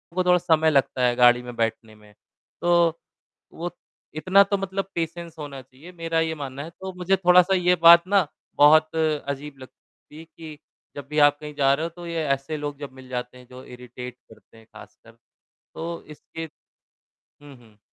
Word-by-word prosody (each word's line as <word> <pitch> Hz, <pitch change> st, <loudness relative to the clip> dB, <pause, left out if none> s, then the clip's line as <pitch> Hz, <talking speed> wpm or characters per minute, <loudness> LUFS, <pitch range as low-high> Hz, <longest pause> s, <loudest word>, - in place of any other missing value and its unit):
को 185 Hz, -, +1 dB
थोड़ा 180 Hz, 0 st, +4 dB
समय 160 Hz, -3 st, +2 dB
लगता 135 Hz, -3 st, +1 dB
है 120 Hz, -1 st, +2 dB
गाड़ी 120 Hz, 0 st, +5 dB
में 120 Hz, -1 st, -9 dB
बैठने 115 Hz, -1 st, -3 dB
में। 105 Hz, -1 st, -20 dB, 0.5 s
तो, 170 Hz, -1 st, +2 dB, 0.5 s
वो 175 Hz, +2 st, -5 dB, 0.5 s
इतना 185 Hz, +5 st, +4 dB
तो 200 Hz, 0 st, -1 dB
मतलब 195 Hz, 0 st, -3 dB
पेशेंस 170 Hz, 0 st, -5 dB
होना 140 Hz, -3 st, -8 dB
चाहिए, 135 Hz, +7 st, -16 dB
मेरा 165 Hz, -2 st, -2 dB
ये 160 Hz, 0 st, -1 dB
मानना 140 Hz, -2 st, -7 dB
है 160 Hz, -, -9 dB
तो 190 Hz, +3 st, -9 dB
मुझे 180 Hz, +2 st, +1 dB
थोड़ा-सा 180 Hz, +1 st, +4 dB
ये 180 Hz, -1 st, +2 dB
बात 170 Hz, +1 st, +8 dB
ना 200 Hz, -2 st, +3 dB, 0.3 s
बहुत 155 Hz, +2 st, +5 dB
अजीब 150 Hz, -2 st, -2 dB
लगती 130 Hz, +3 st, -18 dB
है -, -, -10 dB
कि 160 Hz, -2 st, -12 dB, 0.4 s
जब 145 Hz, -1 st, -8 dB
भी 150 Hz, 0 st, -1 dB
आप 145 Hz, 0 st, +5 dB
कहीं 150 Hz, 0 st, -8 dB
जा 135 Hz, -1 st, +3 dB
रहे 155 Hz, +4 st, -2 dB
हो, -, -, -4 dB
तो 175 Hz, +1 st, -12 dB
ये 165 Hz, -1 st, -3 dB
ऐसे 140 Hz, +2 st, -2 dB
लोग 145 Hz, -1 st, -6 dB
जब 145 Hz, -2 st, -8 dB
मिल 130 Hz, -1 st, -14 dB
जाते 125 Hz, 0 st, -5 dB
हैं, 125 Hz, -1 st, -16 dB
जो 130 Hz, 0 st, -12 dB
इरिटेट 125 Hz, 0 st, -10 dB, 0.2 s
करते 110 Hz, -, -19 dB
हैं 110 Hz, -, -18 dB
ख़ासकर। -, -, -17 dB, 0.6 s
तो 170 Hz, +1 st, -6 dB
इसके 165 Hz, +2 st, -9 dB, 1.0 s
हुँ, 145 Hz, -1 st, -13 dB
हुँ। 110 Hz, -3 st, -22 dB
155 Hz, 185 wpm, -23 LUFS, 130-170 Hz, 1.0 s, बात